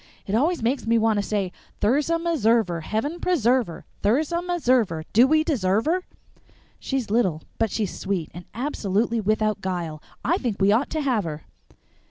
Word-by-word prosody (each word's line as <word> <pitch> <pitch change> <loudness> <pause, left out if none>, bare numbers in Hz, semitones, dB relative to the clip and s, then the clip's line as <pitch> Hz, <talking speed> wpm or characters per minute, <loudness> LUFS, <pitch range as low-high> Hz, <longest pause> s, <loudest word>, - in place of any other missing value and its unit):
"It 195 - -4
always 300 +5 +1
makes 250 +1 0
me 230 0 +4
want 220 -2 +2
to - - +2
say: 200 -3 -2 0.3
Thirza 290 +9 +2
Meserver 230 - +1
Heaven 250 - -2
preserve 255 - +2
her! 170 - -9 0.2
Thirza 300 +11 +1
Meserver 255 - +1
Do 240 +4 +6
we 310 +2 +3
deserve 220 - +1
her? 360 +4 0 0.7
She's 260 -6 -3
little, 185 -9 +1 0.2
but 225 - +2
she's 205 -2 -2
sweet, 190 -5 -2
and 175 +1 -9
absolutely 225 -3 0
without 215 0 0
guile. 170 -5 -3 0.2
I 345 +7 +2
think 230 -6 -2
we 195 +1 +4
ought 235 +7 +2
to 315 - -2
have 250 -7 +1
her." 155 -1 -5
225 Hz, 170 wpm, -24 LUFS, 200-280 Hz, 0.7 s, Do